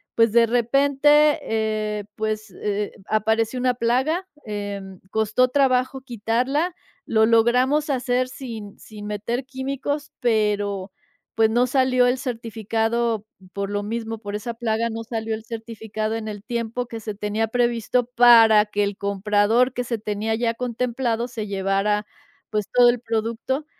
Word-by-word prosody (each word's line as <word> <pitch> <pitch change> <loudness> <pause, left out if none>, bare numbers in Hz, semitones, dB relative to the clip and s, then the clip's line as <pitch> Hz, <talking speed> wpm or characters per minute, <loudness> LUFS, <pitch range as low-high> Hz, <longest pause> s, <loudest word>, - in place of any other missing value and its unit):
pues 230 -2 +4
de 235 -1 +6
repente, 280 +5 +4
eh, 215 -1 -1
pues, 215 -1 -3
eh, 205 0 -1 0.2
apareció 220 +3 +1
una 250 0 +2
plaga, 265 +11 0 0.2
em, 200 -3 -5
costó 220 +3 +2
trabajo 260 -1 +2
quitarla. 255 - -1 0.3
Lo 220 -1 +3
logramos 250 +6 +3
hacer 255 -1 +1
sin 225 -7 -8
sin 210 -1 -10
meter 220 +5 -3
químicos, 275 +2 -4
pero 205 -4 0 0.4
pues 220 -1 +4
no 240 +2 +3
salió 255 -1 +3
el 250 +1 +2
certificado, 225 -2 -1 0.3
por 200 0 -3
lo 205 0 -1
mismo, 225 0 -4
por 205 -1 -6
esa 235 +3 -4
plaga 230 0 -1
no 225 +1 -5
salió 225 -1 -3
el 220 +1 -10
certificado 220 -1 -4
en 220 -1 -4
el 205 -1 -6
tiempo 235 0 -3
que 230 -1 -7
se 215 -1 -6
tenía 210 +2 -1
previsto, 240 +1 +1
para 230 -3 +6
que 205 0 -1
el 200 -1 -2
comprador 210 +5 +2
que 245 0 -3
se 235 -1 -2
tenía 215 +1 -2
ya 230 0 0
contemplado 240 -1 -1
se 220 -3 -5
llevara, 195 +2 0 0.5
pues 210 -2 -1
todo 245 -1 +7
el 240 -1 +1
producto. 230 +5 -2
225 Hz, 145 wpm, -23 LUFS, 215-250 Hz, 0.5 s, todo